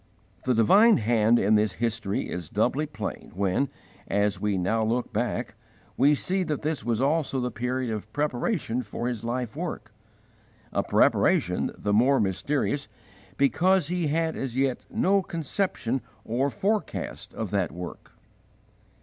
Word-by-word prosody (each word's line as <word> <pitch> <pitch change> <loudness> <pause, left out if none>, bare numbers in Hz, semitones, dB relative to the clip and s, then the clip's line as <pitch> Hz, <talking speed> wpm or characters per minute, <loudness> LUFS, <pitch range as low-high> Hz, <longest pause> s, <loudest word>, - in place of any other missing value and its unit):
The 130 -1 +2
divine 205 - +6
Hand 115 0 +3
in 105 -1 +3
this 105 -2 +3
history 115 -2 -2
is 85 -4 -5
doubly 130 +8 +1
plain 110 -8 -6
when, 100 +8 +1 0.4
as 100 -1 +1
we 105 -2 +1
now 110 +5 +1
look 120 +3 -1
back, - - -1 0.4
we 145 +3 +5
see 190 +6 -1
that 155 -5 -2
this 155 -1 -1
was 115 -2 0
also 140 0 +1
the 125 0 -2
period 125 +2 -2
of 105 0 -6
preparation 145 - -1
for 120 +1 -4
his 120 -3 -3
life 120 0 -3
work 165 -8 -5 0.8
a - - +2
preparation - - +2
the 105 - -1
more 130 +6 +4
mysterious 140 +8 0 0.5
because 175 +4 +3
he 175 -2 0
had 160 +2 0
as 130 -2 -4
yet 135 -2 0
no 195 +1 +2
conception 160 - -2 0.2
or 130 +5 0
forecast 200 - -2
of 110 -4 -4
that 100 -5 0
work. 90 +2 -8
125 Hz, 145 wpm, -26 LUFS, 110-150 Hz, 0.8 s, divine